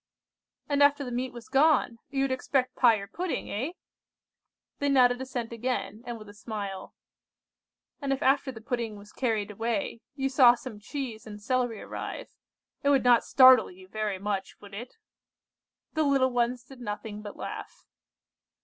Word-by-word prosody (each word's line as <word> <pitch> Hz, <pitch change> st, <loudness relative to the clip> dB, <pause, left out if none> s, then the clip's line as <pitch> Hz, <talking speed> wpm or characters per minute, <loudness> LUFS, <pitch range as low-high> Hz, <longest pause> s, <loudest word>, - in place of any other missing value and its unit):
"And 285 Hz, -1 st, +1 dB
after 285 Hz, 0 st, +5 dB
the 250 Hz, -, -5 dB
meat 250 Hz, +2 st, -2 dB
was 240 Hz, -1 st, -11 dB
gone, 270 Hz, -4 st, +3 dB
you 270 Hz, -1 st, 0 dB
would 275 Hz, -, 0 dB
expect 260 Hz, 0 st, 0 dB
pie 240 Hz, -3 st, +6 dB
or 200 Hz, -2 st, -5 dB
pudding, 350 Hz, -, -4 dB
eh?" 260 Hz, -, -2 dB, 1.1 s
They 285 Hz, -, +1 dB
nodded 250 Hz, -2 st, +4 dB
assent 245 Hz, -3 st, -4 dB
again, 230 Hz, -2 st, -3 dB
and 240 Hz, -1 st, -4 dB
with 215 Hz, -1 st, -12 dB
a 205 Hz, -, -11 dB
smile. 205 Hz, -3 st, -6 dB, 1.1 s
"And 280 Hz, -1 st, -1 dB
if 270 Hz, -, 0 dB
after 270 Hz, 0 st, +3 dB
the 225 Hz, -3 st, -11 dB
pudding 230 Hz, -2 st, -3 dB
was 205 Hz, +1 st, -14 dB
carried 220 Hz, -5 st, -1 dB
away, 225 Hz, +1 st, -2 dB
you 270 Hz, -2 st, 0 dB
saw 255 Hz, -3 st, +6 dB
some 240 Hz, -3 st, -9 dB
cheese 235 Hz, -1 st, -6 dB
and 210 Hz, -1 st, -8 dB
celery 240 Hz, 0 st, -1 dB
arrive, -, -, -6 dB, 0.5 s
it 280 Hz, -, +2 dB
would 275 Hz, -2 st, +4 dB
not 245 Hz, -2 st, +5 dB
startle 255 Hz, -3 st, +7 dB
you 185 Hz, +1 st, -14 dB
very 210 Hz, 0 st, -2 dB
much, 195 Hz, 0 st, -3 dB
would 200 Hz, -1 st, -14 dB
it?" 235 Hz, +5 st, -8 dB, 1.0 s
The 315 Hz, -, +1 dB
little 275 Hz, -3 st, +3 dB
ones 245 Hz, 0 st, 0 dB
did 260 Hz, 0 st, -14 dB
nothing 210 Hz, -1 st, -5 dB
but 205 Hz, -1 st, -9 dB
laugh. -, -, -7 dB
245 Hz, 165 wpm, -28 LUFS, 215-265 Hz, 1.1 s, startle